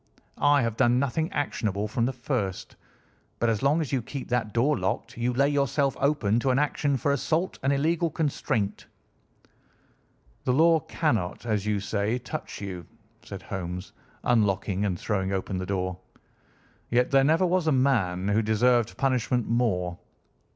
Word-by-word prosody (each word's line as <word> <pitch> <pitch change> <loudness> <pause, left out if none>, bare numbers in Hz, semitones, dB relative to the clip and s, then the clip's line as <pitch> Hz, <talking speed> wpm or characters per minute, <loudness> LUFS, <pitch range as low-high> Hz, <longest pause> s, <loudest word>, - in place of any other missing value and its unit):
I 145 -2 +4
have 115 -1 -2
done 120 +1 +4
nothing 140 +6 0
actionable 105 -7 -1
from 115 +3 0
the - - 0
first, 120 -7 -3 0.6
but 120 - +1
as 110 -2 0
long 145 +4 +3
as 150 - -4
you 135 -3 +1
keep 135 +4 -7
that 120 -3 0
door 130 +7 +2
locked 100 +5 -3
you 120 +1 0
lay 135 +3 +2
yourself 140 -1 +1
open 135 -7 +2
to 130 - 0
an 130 - +3
action 145 -1 +1
for 140 - 0
assault 160 +6 -1
and 135 - +1
illegal 160 +4 +1
constraint." 140 -9 -2 1.6
"The 125 - +1
law 165 +3 +5
cannot, 120 - -2
as 105 -3 -1
you 105 -1 +1
say, 105 +3 -1
touch 125 - -7
you," 95 -3 -5 0.4
said 100 -2 -9
Holmes, 90 -1 -5 0.3
unlocking 100 -3 +1
and 90 -4 -1
throwing 95 -3 -1
open 95 0 -2
the 90 - -4
door, 95 -2 -2 0.9
"yet 125 +1 +2
there 135 -1 +5
never 160 +6 +3
was 180 -2 +1
a - - +4
man 110 -9 +1
who 105 +2 +3
deserved 115 +2 +2
punishment 125 -3 0
more. 90 -7 0
120 Hz, 160 wpm, -26 LUFS, 100-140 Hz, 1.6 s, law